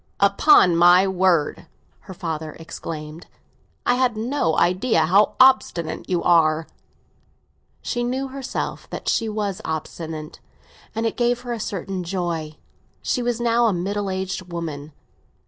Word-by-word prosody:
"Upon 200 - +5
my 175 +3 +6
word," 185 -4 +1 0.3
her 190 - -11
father 160 -3 -4
explained, 160 0 -8 0.6
"I - - +3
had 250 -3 +1
no 230 - 0
idea 185 -1 +2
how 195 +6 +3
obstinate 255 -11 +3
you 180 -2 0
are!" 160 -2 +3 1.2
She 240 -1 -2
knew 260 +2 -2
herself 270 -1 -5
that - - -7
she 225 -2 +1
was 205 -3 -3
obstinate, 160 0 -6 0.6
and 225 +1 -1
it 225 - -1
gave 240 0 +1
her 245 -1 -4
a 230 - -5
certain 195 -2 -4
joy. 170 -4 -3 0.5
She 250 - 0
was 240 -1 -1
now 235 0 +2
a 215 - +2
middle 200 +3 -2
aged 190 -1 -4
woman. 155 -3 -5
185 Hz, 135 wpm, -22 LUFS, 165-230 Hz, 1.2 s, my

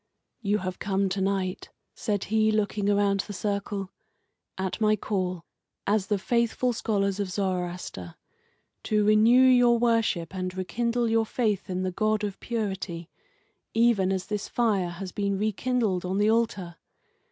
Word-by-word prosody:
"You 205 -1 +1
have 185 -2 -5
come 195 -1 0
to 190 +1 -2
night," 190 -1 -1 0.2
said 205 -4 -2
he, 220 +1 +2
looking 205 -1 0
around 200 -1 +2
the 205 - -3
circle, 200 0 -3 0.7
"at 190 +3 -3
my 215 0 +4
call, 185 -5 -3 0.4
as 200 -1 +1
the 210 - +1
faithful 235 +4 +1
scholars 200 -3 0
of 200 -2 -1
Zoroaster, 180 - -3 0.7
to 210 -1 +2
renew 220 +4 +6
your 245 -2 +6
worship 230 -8 +1
and 185 0 -4
rekindle 235 +5 0
your 225 0 +2
faith 210 -6 -1
in 185 0 -2
the 185 - -1
God 215 +2 0
of 200 -2 -3
Purity, 195 -7 -4 0.6
even 225 -5 +3
as 190 -1 -1
this 210 -1 -4
fire 205 -7 +1
has 180 +2 -6
been 200 0 -1
rekindled 215 -2 0
on 185 +1 -2
the 210 +2 +3
altar. 200 -7 -1
200 Hz, 150 wpm, -27 LUFS, 185-220 Hz, 0.7 s, renew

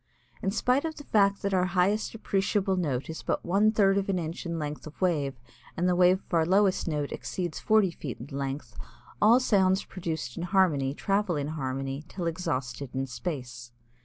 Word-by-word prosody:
In 195 - 0
spite 250 +7 +2
of 320 -1 -3
the 290 - -9
fact 200 -5 +2
that 200 0 0
our 180 -1 +3
highest 205 +5 +2
appreciable 200 -2 0
note 145 -8 -1
is 160 - -6
but - - -2
one 200 +5 +4
third 200 -2 +3
of 195 - -4
an 190 - +1
inch 170 +1 -4
in 170 0 -2
length 150 0 -5
of 155 - -12
wave 150 -7 +1 0.4
and 175 +2 +1
the 180 - +3
wave 180 +1 +4
of - - -16
our 165 -1 +4
lowest 190 +2 +2
note 150 -3 -1
exceeds 175 -4 -4
forty 215 -4 +3
feet 140 -7 -7
in 135 +4 -8
length, 135 -3 -4 0.5
all 225 +4 +7
sounds 190 -6 +3
produced 160 -10 -5
in - - -3
harmony 170 -7 +2
travel 195 -1 0
in 145 0 -2
harmony 135 -1 -3
till 180 -1 -5
exhausted 140 -6 -3
in 135 0 0
space. 125 -4 -6
175 Hz, 190 wpm, -28 LUFS, 145-195 Hz, 0.5 s, all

